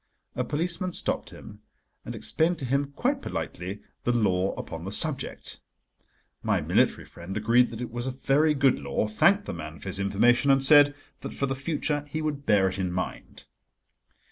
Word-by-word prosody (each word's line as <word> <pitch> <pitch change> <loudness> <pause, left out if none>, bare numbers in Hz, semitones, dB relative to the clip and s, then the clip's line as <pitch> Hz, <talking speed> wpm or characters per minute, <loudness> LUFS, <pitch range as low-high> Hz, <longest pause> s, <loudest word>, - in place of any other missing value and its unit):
A - - -1
policeman 175 +4 -2
stopped - - -2
him - - -13 0.4
and - - -7
explained 165 +2 0
to 135 - -5
him 140 +2 -1
quite 270 +2 0
politely 95 +4 -5 0.2
the 120 - +1
law 95 -5 +1
upon 80 0 -7
the 95 - -5
subject. 150 +5 +2 0.8
My - - +1
military - - +1
friend 90 +4 -8
agreed 120 +3 +3
that 115 0 -8
it 120 - -5
was 120 +2 -3
a 130 0 -5
very 150 +3 +2
good 135 -2 +3
law, 70 +8 -2
thanked 195 - +3
the - - -5
man 80 -1 -8
for 95 - -7
his 95 - +1
information, 120 +7 +2
and 135 0 +4
said 145 0 +6 0.2
that - - -7
for 140 - -1
the 135 - -2
future 145 +1 -2
he 155 - -3
would 150 -2 -4
bear 100 -3 +4
it 95 +1 -4
in 90 -2 -1
mind. 90 +1 -6
130 Hz, 185 wpm, -26 LUFS, 100-145 Hz, 0.8 s, said